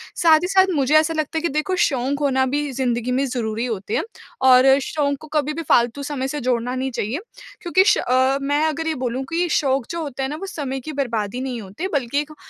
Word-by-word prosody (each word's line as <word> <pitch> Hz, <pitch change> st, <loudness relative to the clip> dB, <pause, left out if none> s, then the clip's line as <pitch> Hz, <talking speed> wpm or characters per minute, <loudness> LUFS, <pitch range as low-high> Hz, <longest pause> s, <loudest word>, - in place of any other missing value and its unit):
साथ 320 Hz, -2 st, +5 dB
ही -, -, 0 dB
साथ 380 Hz, 0 st, +4 dB
मुझे 280 Hz, +1 st, +2 dB
ऐसा 310 Hz, +1 st, +4 dB
लगता 315 Hz, 0 st, -2 dB
है -, -, 0 dB
कि 340 Hz, -, 0 dB
देखो 305 Hz, +6 st, -1 dB
शौक 270 Hz, 0 st, 0 dB
होना 265 Hz, -2 st, +2 dB
भी 290 Hz, +2 st, -2 dB
ज़िन्दगी 245 Hz, -2 st, -1 dB
में 265 Hz, +2 st, +1 dB
ज़रूरी 235 Hz, -3 st, -2 dB
होते 215 Hz, -3 st, -3 dB
हैं। -, -, 0 dB, 0.4 s
और 260 Hz, +1 st, +6 dB
शौक 300 Hz, -, -3 dB, 0.2 s
को 310 Hz, -, -11 dB
कभी 300 Hz, -1 st, -1 dB
भी 330 Hz, -, -4 dB
फ़ालतू 240 Hz, +4 st, +2 dB
समय 275 Hz, -2 st, -3 dB
से 295 Hz, +2 st, -4 dB
जोड़ना 245 Hz, 0 st, -1 dB
नहीं 265 Hz, +1 st, -2 dB
चाहिए। 235 Hz, +4 st, -3 dB, 0.4 s
क्योंकि 370 Hz, +1 st, +3 dB
श 430 Hz, -, +4 dB
अ, 260 Hz, +2 st, +2 dB
मैं 290 Hz, +2 st, +1 dB
अगर 315 Hz, +1 st, -2 dB
ये 320 Hz, -, +1 dB
बोलूँ 255 Hz, 0 st, -3 dB
कि 345 Hz, +2 st, 0 dB
शौक 270 Hz, -4 st, +1 dB
जो 335 Hz, 0 st, -3 dB
होता 275 Hz, -3 st, -4 dB
है 265 Hz, -, -2 dB
ना 295 Hz, -, -4 dB
वो 335 Hz, -, -6 dB
समय 280 Hz, -8 st, -4 dB
की 285 Hz, +4 st, -7 dB
बर्बादी 240 Hz, -4 st, -2 dB
नहीं 255 Hz, -3 st, -4 dB
होते 205 Hz, -, -5 dB
बल्कि 280 Hz, -1 st, 0 dB
एक 300 Hz, +1 st, -4 dB
अ, -, -, -12 dB
270 Hz, 240 wpm, -21 LUFS, 250-305 Hz, 0.4 s, और